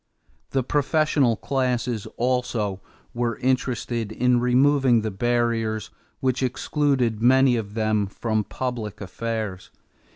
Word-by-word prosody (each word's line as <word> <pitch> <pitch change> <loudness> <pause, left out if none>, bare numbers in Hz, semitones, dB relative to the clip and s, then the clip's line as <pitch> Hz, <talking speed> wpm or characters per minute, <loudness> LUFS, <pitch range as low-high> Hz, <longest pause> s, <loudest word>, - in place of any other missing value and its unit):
The 135 -1 0
professional 145 -2 +2
classes 125 -4 -1
also 120 -6 -1 0.3
were 120 -1 -1
interested 120 -3 -1
in 125 +2 +2
removing 130 0 +3
the 110 0 -3
barriers 115 0 0 0.3
which 130 -1 0
excluded 130 -3 0
many 130 +1 +5
of 105 -2 -4
them 110 -2 +1
from 110 +2 -1
public 115 -1 -4
affairs. 105 -1 -4
120 Hz, 105 wpm, -24 LUFS, 110-130 Hz, 0.3 s, many